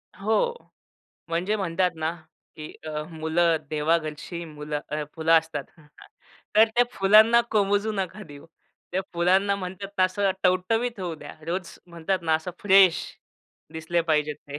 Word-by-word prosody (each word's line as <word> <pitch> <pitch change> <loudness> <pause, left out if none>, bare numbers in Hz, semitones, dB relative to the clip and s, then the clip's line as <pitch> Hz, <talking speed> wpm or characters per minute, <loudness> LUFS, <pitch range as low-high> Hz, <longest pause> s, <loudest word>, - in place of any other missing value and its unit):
हो. 220 - +1 0.8
म्हणजे 180 +6 0
म्हणतात 180 -1 0
ना, 160 +1 -1 0.4
की 155 -1 -8
अ, 150 -1 -3
मुलं 160 +1 +1
देवाघरची 155 +2 -1
मुलं 150 -1 -5
फुलं 160 0 +1
असतात. 160 -3 -5 0.9
तर 220 - +9
त्या 245 0 +5
फुलांना 215 +4 +6
कोमेजू 205 +1 +1
नका 195 +1 -4
देऊ. 145 -4 -13 0.5
त्या 190 - 0
फुलांना 190 +4 +2
म्हणतात 190 +1 -6
ना 185 - +6
असं 195 +1 +1
टवटवीत 220 +5 +1
होऊ 175 -3 -3
द्या. 155 - -11
रोज 180 +1 -4
म्हणतात 170 +2 -2
ना 160 -1 +2
असं 160 +3 -2
फ्रेश 195 -3 +5 0.7
दिसले 160 +2 -1
पाहिजेत 150 -2 0
ते. 145 - -6
175 Hz, 135 wpm, -25 LUFS, 160-195 Hz, 0.9 s, तर